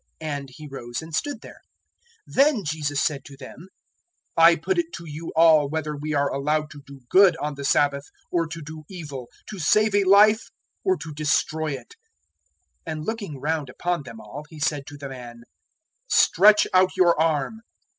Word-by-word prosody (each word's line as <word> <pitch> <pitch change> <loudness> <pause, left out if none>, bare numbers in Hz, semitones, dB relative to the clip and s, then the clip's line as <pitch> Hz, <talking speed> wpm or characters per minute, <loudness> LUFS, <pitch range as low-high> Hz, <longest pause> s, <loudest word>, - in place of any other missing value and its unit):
And 145 -3 -5
he 150 +4 -11
rose 120 -1 -6
and 160 0 -11
stood 285 - -2
there. - - -13 0.7
006:009 - - -15
Then 275 -6 +4
Jesus 145 -2 -1
said 145 -4 -1
to 140 - -13
them, 140 +6 -12 0.7
"I 165 +1 +7
put 370 - -1
it 340 0 -2
to 170 - -8
you 160 +1 -7
all 160 -3 +5
whether 155 0 -3
we 150 +1 -4
are 140 0 +1
allowed 150 +2 -1
to 145 - -11
do 140 -1 -13
good 185 +2 +5
on 150 -1 -3
the 140 0 -8
Sabbath, 140 0 +2 0.3
or 170 -2 0
to 165 0 -8
do 155 +1 -9
evil; 145 -9 -8 0.2
to 210 - -8
save 215 +6 +3
a 205 0 +3
life, 210 +4 +5 0.3
or 375 -1 +2
to 155 - -8
destroy 155 +1 0
it." 125 -3 -9 0.9
006:010 - - -3
And 155 -1 -5
looking 205 - -5
round 150 -1 -2
upon 175 +5 -2
them 115 -5 -11
all 130 +8 -9
He 160 - -12
said 150 -2 -1
to 145 - -10
the 140 -1 -7
man, 120 -3 -10 0.7
"Stretch 210 +1 +5
out 185 0 +3
your 170 -3 +4
arm." 160 +6 0
155 Hz, 185 wpm, -24 LUFS, 140-175 Hz, 0.9 s, I